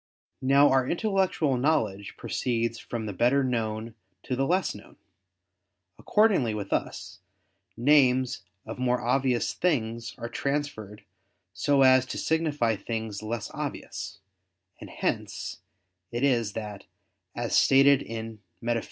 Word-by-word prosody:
Now 140 +2 +5
our 130 -1 +3
intellectual 185 - +1
knowledge 115 -8 0
proceeds 115 -1 -2
from 115 -2 -5
the 105 - -4
better 125 +7 +3
known 115 -2 -2 0.3
to 130 - -2
the 135 +2 0
less 185 +3 +1
known. - - -14 1.0
Accordingly 195 - +3
with 100 -2 -4
us, 95 +2 -3 0.6
names 130 -2 +3 0.2
of 110 +3 -7
more 125 -1 +1
obvious 125 0 +1
things 115 -9 -1
are 115 - -5
transferred 140 -7 -3 0.5
so 135 +10 +3
as 130 0 +5
to - - -5
signify 150 -9 0
things 110 -2 -4
less 110 0 -4
obvious: - - -5 0.6
and - - -10
hence - - -3 0.5
it 120 +2 -2
is 120 -7 +2
that, 105 -3 -6 0.5
as - - -1
stated 135 +1 +6
in 115 -1 -7 0.2
_Metaph. 120 0 0
125 Hz, 125 wpm, -27 LUFS, 110-140 Hz, 1.0 s, stated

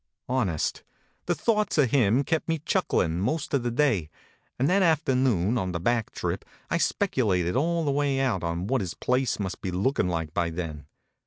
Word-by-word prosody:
Honest, 105 -12 -1 0.5
the - - +2
thoughts 215 -5 +1
of 135 -6 +3
him 125 0 +3
kept 160 +2 -1
me 165 - +1
chucklin 85 - +1
most 150 +9 -1
of 140 - +2
the 120 - -1
day, 120 - +1 0.5
and 130 - +2
that 190 +4 +3
after 160 -6 +3
noon 120 -4 +2
on 90 -3 -2
the 85 - -2
back 115 +4 0
trip - - -3 0.3
I - - +2
speculated 105 - +1
all 165 +4 +1
the 145 - +1
way 140 -1 +1
out 125 -10 0
on 85 +1 -2
what 130 +3 0
his 90 -4 -4
place 125 -1 0
must 95 -2 -4
be 95 - -3
lookin 95 +3 0
like 80 -3 -3
by 85 -1 0
then. 80 -4 -6
120 Hz, 190 wpm, -26 LUFS, 90-140 Hz, 0.5 s, of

